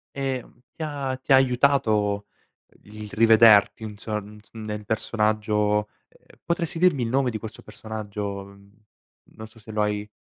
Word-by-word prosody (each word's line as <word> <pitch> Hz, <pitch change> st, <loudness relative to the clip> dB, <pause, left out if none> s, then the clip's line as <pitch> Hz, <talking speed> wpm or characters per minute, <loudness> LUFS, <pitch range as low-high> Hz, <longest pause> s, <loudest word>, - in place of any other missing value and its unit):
Ehm 135 Hz, -3 st, -4 dB
ti 160 Hz, -, -9 dB
ha 140 Hz, -3 st, -3 dB
ti 130 Hz, +2 st, -1 dB
ha -, -, +9 dB
aiutato 120 Hz, -6 st, +2 dB, 0.6 s
il 105 Hz, 0 st, -9 dB
rivederti 110 Hz, -1 st, +6 dB
inso 105 Hz, 0 st, -5 dB
n 105 Hz, +1 st, -13 dB
nel 105 Hz, -2 st, -6 dB
personaggio, 105 Hz, -1 st, 0 dB, 0.2 s
ehm -, -, -24 dB
potresti 170 Hz, -1 st, -1 dB
dirmi 170 Hz, -7 st, +3 dB
il 115 Hz, -, -1 dB
nome 130 Hz, 0 st, +1 dB
di 110 Hz, -, -4 dB
questo 110 Hz, 0 st, -9 dB
personaggio? 105 Hz, -2 st, -6 dB, 0.8 s
Non 110 Hz, -, -12 dB
so 115 Hz, +1 st, -20 dB
se 110 Hz, 0 st, -12 dB
lo 105 Hz, 0 st, 0 dB
hai 105 Hz, 0 st, -1 dB
110 Hz, 145 wpm, -24 LUFS, 105-130 Hz, 0.8 s, ha